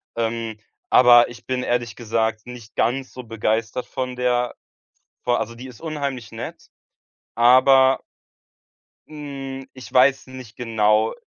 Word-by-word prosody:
Ähm, 115 -1 -3 0.3
aber 120 -1 +7
ich 120 0 -13
bin 130 -1 -2
ehrlich 120 -1 -1
gesagt 110 -1 -2
nicht 120 -3 -11
ganz 130 +3 -1
so 125 - -8
begeistert 115 +1 -2
von 130 -1 -4
der 125 -1 0 0.7
vor 120 0 +1
also, 115 +2 -4
die 125 +3 -10
ist 125 - -14
unheimlich 140 -7 -4
nett, - - -8 0.7
aber 130 +2 +5 1.1
hm, 135 -3 -7
ich 130 -1 -12
weiß 130 +1 +4
nicht 130 -4 -11
genau 110 -2 +1
125 Hz, 125 wpm, -22 LUFS, 115-130 Hz, 1.1 s, aber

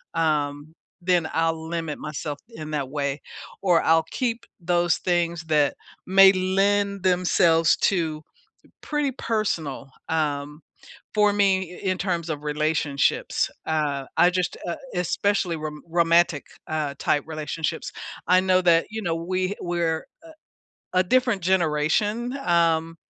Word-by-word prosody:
um, 150 -1 -1 0.3
then 175 -2 +1
I'll 165 0 -1
limit 165 -3 -3
myself 150 -1 -5
in 155 -9 -8
that 140 -3 -2
way, 140 0 -2 0.4
or 180 -4 +3
I'll 165 0 +4
keep 235 -2 -2 0.2
those 175 -1 +1
things 170 -1 0
that 150 -3 +2 0.3
may 195 0 +8
lend 195 +1 +1
themselves 175 -3 +3
to 160 -5 +1 0.6
pretty 295 -2 -1
personal, 170 - -2 0.2
um 150 -1 -2 0.5
for 210 -1 +4
me 190 -3 +1
i - - 0
in 185 - 0
terms 175 -3 -2
of 150 -1 -4
relationships, 150 -1 0 0.2
uh, 150 -3 -1
I 175 - +5
just, 180 -1 -1
uh 170 - -2 0.2
especially 180 +1 0
rom 150 -1 -6
romantic, 170 -2 +3 0.2
uh, 155 -3 -2
type 145 - +1
relationships, 155 0 -4 0.4
I 180 +1 +6
know 185 0 +3
that, 170 -2 +4
you 220 0 -5
know, 170 -4 -1
we 185 +3 -2
we're 170 -2 0
a 330 - -21 0.8
a - - 0
different 245 0 +2
generation, 190 - +1
um, 165 -5 +1
170 Hz, 130 wpm, -24 LUFS, 155-185 Hz, 0.8 s, may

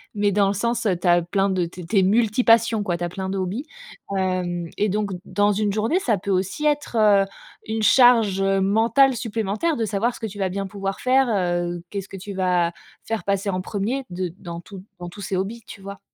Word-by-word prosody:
mais 205 -1 +2
dans 200 0 +3
le 195 - +1
sens, 235 +3 -1
heu, 195 -4 +2
tu 175 - -2
as 175 0 +5
plein 195 +3 0
de 185 -2 0
tu 175 +2 -9
es - - -8
tu 200 +4 +2
es - - +4
multi 220 +4 +2
passions 230 -2 +4
quoi, 175 -4 -1
tu 175 - -5
as 175 - -1
plein 190 +1 -5
de 195 - -2
hobbies 190 +9 -3 0.5
hem 180 -2 -1
et 210 - +2
donc, 205 +1 -1
dans 205 0 +2
une 205 0 0
journée, 225 - +1
ça 230 - +1
peut 195 +2 -4
aussi 195 +10 -1
être, 295 -4 0
heu, 205 -2 +5 0.4
une 220 0 -2
charge 225 -3 +5
mentale 220 +7 +3
supplémentaire 225 +7 -1
de 225 - 0
savoir 220 +4 -1
ce - - -11
que - - -4
tu 205 0 -10
vas 190 -1 0
bien 195 +1 -3
pouvoir 195 0 -4
faire, 260 +1 +3
heu, 175 -4 -1
qu'est-ce 200 -1 -5
que 195 - -8
tu 200 +2 -7
vas 180 -2 +1 0.3
faire 225 -1 -3
passer 200 0 -1
en 185 -1 -1
1er 215 +8 -2
de 180 -1 -3
dans 170 -1 -7
tous 195 +1 -11 0.2
dans 175 0 -6
tous 200 +4 -11
ces 195 0 -3
hobbies, 215 +5 -4
tu 200 - -11
vois? 200 0 -8
200 Hz, 235 wpm, -23 LUFS, 185-220 Hz, 0.5 s, as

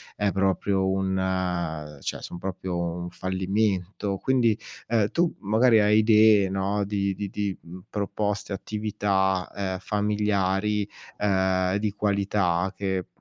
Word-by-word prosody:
è 105 -1 +1
proprio 95 0 +1
un 95 -5 -1
cioè, - - -4
son - - -7
proprio 95 -1 -4
un 85 0 -3
fallimento." 95 +1 -1
Quindi, 120 -2 +2 0.3
ehm, 110 -3 +2
tu, 170 0 +1
magari, 110 +3 +4
hai 105 +1 +4
idee, 110 -2 +5
no, 95 +2 0
di 100 -1 -1
di 100 0 -4
di, 100 -1 -3
mhmm, 90 +2 -11
proposte, 105 0 -2
attività, 95 -2 -1
ehm, 95 -2 -2
familiari, 105 0 0 0.3
ehm, 95 -2 +1
di 105 0 -1
qualità 100 -3 0
che, 95 -2 -2
100 Hz, 125 wpm, -26 LUFS, 95-105 Hz, 0.3 s, idee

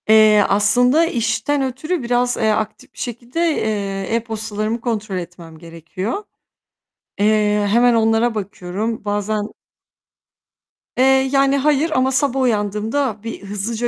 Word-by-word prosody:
Eee, 215 -1 +6
aslında 245 +10 +4
işten 235 +1 -1
ötürü 270 +5 -3
biraz, 245 +1 +1
eee, 220 - +1
aktif 220 +5 -4
bir - - -15
şekilde, 240 +4 -5 0.2
eee, 200 -1 -2
e-postalarımı 220 0 -3
kontrol 215 -5 -3
etmem 170 -2 -9
gerekiyor. 170 - -6 1.0
Eee, 210 0 +2
hemen 240 +3 +4
onlara 225 +1 +2
bakıyorum. 205 +2 -4
Bazen 205 +1 -2 1.4
Eee, 255 - +4 0.3
yani, 275 0 +3
hayır 300 +3 +1
ama 260 -2 +2
sabah 270 -1 +1
uyandığımda, 220 +1 -1
bir 225 -3 -7
hızlıca 210 +4 -2
220 Hz, 115 wpm, -19 LUFS, 205-245 Hz, 1.4 s, Eee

